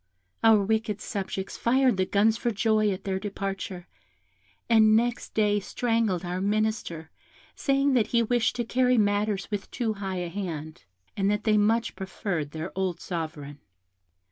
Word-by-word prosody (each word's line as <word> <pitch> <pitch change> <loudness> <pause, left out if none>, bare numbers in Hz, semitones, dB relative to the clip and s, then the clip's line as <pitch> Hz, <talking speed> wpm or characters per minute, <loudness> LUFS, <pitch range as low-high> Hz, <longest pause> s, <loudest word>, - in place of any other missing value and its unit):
Our 220 -2 +6
wicked 220 -1 0
subjects 190 -1 -4
fired 255 -2 +3
the 185 0 +1
guns 215 +2 +3
for 240 - -1
joy 215 -1 +2
at 190 -1 -3
their 190 -1 -2
departure, 195 -2 -5 0.8
and 220 -2 +5
next 235 +1 0
day 210 -1 +3
strangled 225 -4 -1
our 180 +1 -3
minister, 205 -6 -1 0.4
saying 275 0 +1
that 230 -4 +3
he 235 0 +2
wished 230 -2 +1
to 240 - -1
carry 250 +1 +2
matters 205 -1 +1
with 205 -2 -3
too 230 -3 -1
high 195 -2 -4
a 175 - -4
hand, 160 - -6 0.3
and 195 0 +1
that 210 +1 0
they 215 -2 +3
much 225 +3 +2
preferred 190 -5 -3
their 160 +4 -6
old 185 -3 -1
Sovereign. 155 -4 -5
205 Hz, 155 wpm, -27 LUFS, 190-225 Hz, 0.8 s, Our